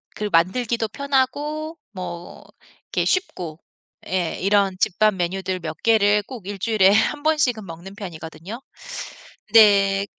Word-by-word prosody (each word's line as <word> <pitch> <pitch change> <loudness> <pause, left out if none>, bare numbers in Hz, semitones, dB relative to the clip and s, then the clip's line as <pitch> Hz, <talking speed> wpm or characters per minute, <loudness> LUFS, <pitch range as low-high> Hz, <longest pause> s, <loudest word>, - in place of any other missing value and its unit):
그 210 -1 -3
만들기도 225 +7 +1
편하고 285 +5 -1 0.2
뭐 175 -2 -7 0.5
이렇게 - - +1
쉽고 175 - -2 0.5
예 180 -3 -1
이런 195 0 +2
집밥 215 +2 +3
메뉴들 185 +1 -2
몇 160 -2 -6
개를 210 -2 +4
꼭 225 -4 -10
1 205 0 -4
주일에 205 -2 +4
1 290 +8 +2
번씩은 265 -9 +1
먹는 170 +3 -10
편이거든요. 180 +3 -8 0.9
네. 200 -2 +6
200 Hz, 235 characters per minute, -22 LUFS, 185-235 Hz, 0.9 s, 네